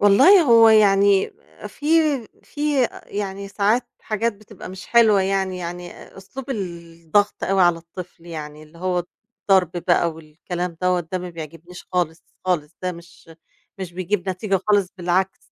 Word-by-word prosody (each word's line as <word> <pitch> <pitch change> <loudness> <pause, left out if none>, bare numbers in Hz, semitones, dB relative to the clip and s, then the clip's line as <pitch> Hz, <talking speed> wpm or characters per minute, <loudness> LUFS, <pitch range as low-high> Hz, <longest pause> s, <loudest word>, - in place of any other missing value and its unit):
والله 205 - +7
هو 230 -4 +7
يعني 200 - +4 0.4
في 290 - -9 0.6
في 290 -3 0 0.2
يعني 200 -1 -5
ساعات 215 +5 +1
حاجات 225 +2 -1
بتبقى 210 -1 -12
مش 185 +1 -9
حلوة 220 -4 +5
يعني، 190 -1 -1
يعني 175 0 -6 0.2
أسلوب 240 +8 -9
الضغط 170 -2 -2
أوي 195 -1 +2
على 175 -1 +4
الطفل 170 0 -11
يعني 155 -2 -7
اللي 155 +2 -17
هو 180 -1 -1 0.4
الضرب 190 -4 +3 0.2
بقى 170 -1 +3
والكلام 165 +3 -6
دوّة 180 -1 +2
ده 175 +2 -4
ما 180 0 -6
بيعجبنيش 165 +2 -10
خالص، 165 -3 -1 0.2
خالص 170 -4 -1
ده 180 0 -1
مش 170 -1 -15 0.5
مش 180 -2 -6
بيجيّب 185 +1 -2
نتيجة 190 +1 -1
خالص، 205 -3 +3
بالعكس. 185 +2 0
185 Hz, 145 wpm, -22 LUFS, 170-205 Hz, 0.6 s, والله